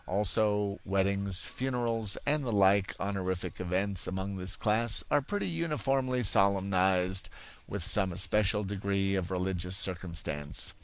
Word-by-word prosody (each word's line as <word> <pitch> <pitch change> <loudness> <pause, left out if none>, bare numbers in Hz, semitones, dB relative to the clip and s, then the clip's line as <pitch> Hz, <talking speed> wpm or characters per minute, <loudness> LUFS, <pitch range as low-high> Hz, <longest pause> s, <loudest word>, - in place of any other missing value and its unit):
Also, 105 +1 0
weddings, 100 -1 +1
funerals, 120 -5 -1
and 145 +1 +1
the 120 - -2
like 100 -1 +3
honorific 95 -2 -3
events 95 +1 -1
among 95 +1 -4
this 95 +1 0
class 110 +2 +2
are 145 - +4
pretty 205 +9 -3
uniformly 135 -7 -1
solemnized 95 -2 +2 0.4
with 100 -3 -4
some 95 0 +1
especial 105 +3 +2
degree 100 0 -1
of 95 -2 -1
religious 90 0 -2
circumstance. 85 -7 -2
100 Hz, 120 wpm, -30 LUFS, 95-110 Hz, 0.4 s, are